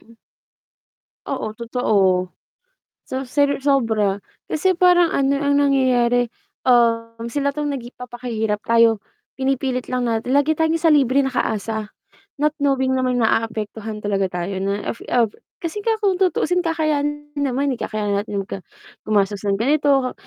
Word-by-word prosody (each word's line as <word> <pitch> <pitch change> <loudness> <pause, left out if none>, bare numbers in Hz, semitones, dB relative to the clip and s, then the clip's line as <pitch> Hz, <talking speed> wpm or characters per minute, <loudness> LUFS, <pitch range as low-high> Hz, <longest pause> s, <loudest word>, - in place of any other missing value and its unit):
Hmm. 230 - -20 1.1
Oo 215 - -3
totoo. 200 -6 +1 0.8
So, 260 +1 -4
sar 285 +2 +1
sobra 225 -8 +2 0.3
kasi 370 +5 +2
parang 355 -1 +4
ano 275 0 +2
ang 285 -1 +1
nangyayari, 245 -3 +3 0.4
Um, 230 -1 +2
sila 280 +3 -1
'tong 295 0 -2
napapakahirap 240 -4 -4
tayo 230 -1 +4 0.4
pinipilit 265 -1 -1
lang 250 -2 -1
natin 230 +3 -1
lagi 290 +2 +3
tayong 320 0 +1
sa 330 - +4
libreng 275 -2 +3
naka-asa, 220 -3 -2 0.4
not 300 +1 +1
knowing 265 -2 +2
namang 255 -1 +1
na-aapektuhan 220 -1 -1
talaga 200 -2 -1
tayo 180 +2 -4
na 200 +1 -2
af 230 - -17
ah, 240 -2 +4 0.3
kasi 345 +5 -5
kung 410 -4 0
tutuusin 360 -1 +2
kakay 320 -2 0 0.4
naman 280 -1 0
eh, 240 - -8
kakayanan 205 -2 -1
natin 205 -2 -4
magka 195 - -5 0.5
gumastos 205 -1 +1
ng 200 -1 0
ganito, 275 +1 +2
250 Hz, 135 wpm, -21 LUFS, 220-285 Hz, 1.1 s, parang